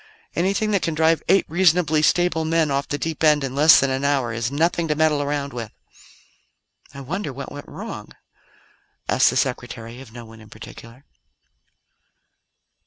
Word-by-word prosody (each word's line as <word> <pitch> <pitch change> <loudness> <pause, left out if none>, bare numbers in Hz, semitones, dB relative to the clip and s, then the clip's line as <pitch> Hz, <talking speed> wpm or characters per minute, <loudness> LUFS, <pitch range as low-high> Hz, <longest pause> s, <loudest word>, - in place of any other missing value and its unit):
Anything 200 +5 0
that 200 -3 +1
can 165 - -2
drive 160 +1 +2
eight 195 +2 +4
reasonably 170 -3 +2
stable 170 0 +2
men 160 -2 +1
off 140 0 -1
the 145 - -3
deep 160 +1 -4
end 150 -2 +4
in 135 -1 -4
less 150 +3 +6
than 135 0 0
an 130 +1 -2
hour 135 -5 0
is 115 +2 -3
nothing 165 +3 0
to 150 - 0
meddle 155 -1 +2
around 145 -1 -3
with." 115 -3 -6 1.2
"I 140 - -10
wonder 160 +4 -4
what 140 +2 -8
went 145 - -9
wrong?" - - -8 1.0
asked - - +3
the - - -2
Secretary 115 +2 -4
of 130 -5 -13
no 120 0 -10
one 110 0 -15
in 110 - -16
particular. 115 +5 -13
145 Hz, 170 wpm, -22 LUFS, 135-165 Hz, 1.2 s, less